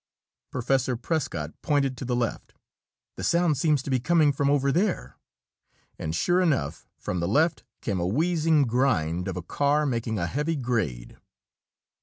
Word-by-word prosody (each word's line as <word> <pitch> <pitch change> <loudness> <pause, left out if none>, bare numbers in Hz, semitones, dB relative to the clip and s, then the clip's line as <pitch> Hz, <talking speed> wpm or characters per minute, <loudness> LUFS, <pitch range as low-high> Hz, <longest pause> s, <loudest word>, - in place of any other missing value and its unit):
Professor 130 0 0
Prescott 115 - -2
pointed 140 -3 +1
to 130 - -6
the 125 0 -1
left. 120 -2 -3 0.6
"The - - -5
sound 170 -2 +2
seems 150 -3 +2
to 140 - -4
be 130 - +2
coming 155 +2 +3
from 140 0 0
over 140 -1 +2
there." 175 - -1 0.8
And 80 0 -3
sure 175 - +2
enough, 140 - 0
from 90 - -3
the 85 - -1
left 155 - +2 0.2
came 100 -4 -1
a 85 - 0
wheezing 160 - +2
grind 100 -9 +1
of 95 -2 -3
a 90 - -4
car 145 - +1
making 115 -4 -1
a 85 - -1
heavy 150 - -1
grade. 110 - -2
130 Hz, 160 wpm, -26 LUFS, 100-150 Hz, 0.8 s, coming